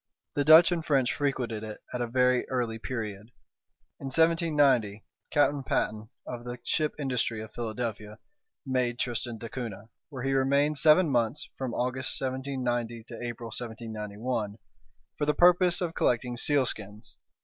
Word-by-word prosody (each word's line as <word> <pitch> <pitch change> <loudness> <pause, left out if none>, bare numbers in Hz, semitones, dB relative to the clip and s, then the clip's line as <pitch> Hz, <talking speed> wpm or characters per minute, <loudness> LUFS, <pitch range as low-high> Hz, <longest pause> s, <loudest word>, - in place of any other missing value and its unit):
The 145 - +1
Dutch 160 +4 +8
and 170 -2 -1
French 135 -6 +2
frequented 125 -6 -2
it 110 -1 -7
at 125 - -2
a 120 - -1
very 125 +1 +2
early 120 -3 -1
period. 110 -3 -5 0.7
In - - -8
1790, 145 - +2 0.2
Captain 145 -1 +2
Patten, 110 -4 -2 0.2
of 120 -1 -6
the 120 0 -6
ship 155 -2 0
Industry, 125 -5 -1
of 110 0 -8
Philadelphia, 110 -2 -4 0.5
made 125 -2 0
Tristan 120 -1 -3
d'Acunha, 115 -2 -7 0.2
where 130 -4 -7
he 135 0 0
remained 140 +2 +2
seven 160 +3 +6
months 120 +3 0
(from 130 -3 -4
August, 125 +1 -1
1790, 125 -3 -2
to 120 - -7
April, 120 -1 -5
1791) 110 -1 -4 0.6
for 145 - 0
the 150 - +2
purpose 180 +1 +5
of 170 -2 -2
collecting 125 -3 0
sealskins. 115 -6 -1
125 Hz, 140 wpm, -28 LUFS, 115-140 Hz, 0.7 s, Dutch